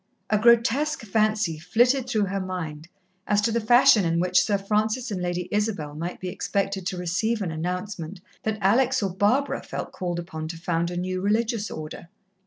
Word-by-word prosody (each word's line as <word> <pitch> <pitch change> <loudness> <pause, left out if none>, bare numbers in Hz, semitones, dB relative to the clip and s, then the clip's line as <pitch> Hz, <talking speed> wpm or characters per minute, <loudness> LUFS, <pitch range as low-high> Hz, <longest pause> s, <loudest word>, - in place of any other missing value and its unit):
A 210 - +3
grotesque 235 +6 +3
fancy 215 -5 +1
flitted 245 - +2
through 215 -4 +1
her 195 +1 -2
mind 170 -5 -5 0.4
as 205 - +3
to 225 - +1
the 235 +1 0
fashion 220 -2 +6
in 165 -1 +1
which 180 +1 +3
Sir 205 -2 +1
Francis 215 +4 -1
and 185 -3 -3
Lady 175 0 -2
Isabel 205 -8 -1
might 170 +4 -5
be 185 - -5
expected 195 +1 -2
to 185 - -3
receive 180 +6 -1
an 185 -5 -2
announcement 180 +2 -4 0.2
that 220 -1 -2
Alex 235 +5 +3
or 195 - 0
Barbara 215 +9 +1
felt - - -6
called 175 -2 -3
upon 160 -2 -5
to 165 +1 -6
found 170 0 -1
a 175 - -5
new 185 +1 -2
religious 220 +2 0
Order. 155 +2 -7
195 Hz, 185 wpm, -25 LUFS, 175-220 Hz, 0.4 s, fashion